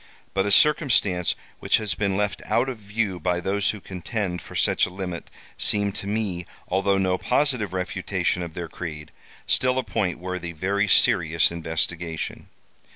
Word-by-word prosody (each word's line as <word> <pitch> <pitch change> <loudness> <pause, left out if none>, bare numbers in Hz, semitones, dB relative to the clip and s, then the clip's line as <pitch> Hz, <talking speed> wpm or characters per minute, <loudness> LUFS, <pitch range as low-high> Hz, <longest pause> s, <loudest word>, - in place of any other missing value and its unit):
But 95 +1 +1
a - - +1
circumstance 115 - +4 0.2
which - - +3
has 105 -3 -1
been 100 -2 0
left 105 0 -1
out 125 +3 +1
of 125 -4 -5
view 100 -2 -2
by 90 +2 0
those 100 +3 +1
who 105 - -2
contend 95 0 -4
for - - -11
such - - +3
a - - -7
limit 90 -2 -6 0.3
seemed 100 -1 +3
to 100 - -6
me, 100 -5 -2 0.2
although 95 +1 +2
no 95 -1 +1
positive 125 -9 +1
refutation 90 -1 -1
of 85 -2 -6
their 85 -1 -4
creed, 75 -2 -7 0.3
still 130 0 +2
a 130 - +1
point 100 -4 -1
worthy 90 -1 -5
very 100 +5 0
serious 85 -5 +4
investigation. 80 0 -3
95 Hz, 160 wpm, -25 LUFS, 90-105 Hz, 0.3 s, circumstance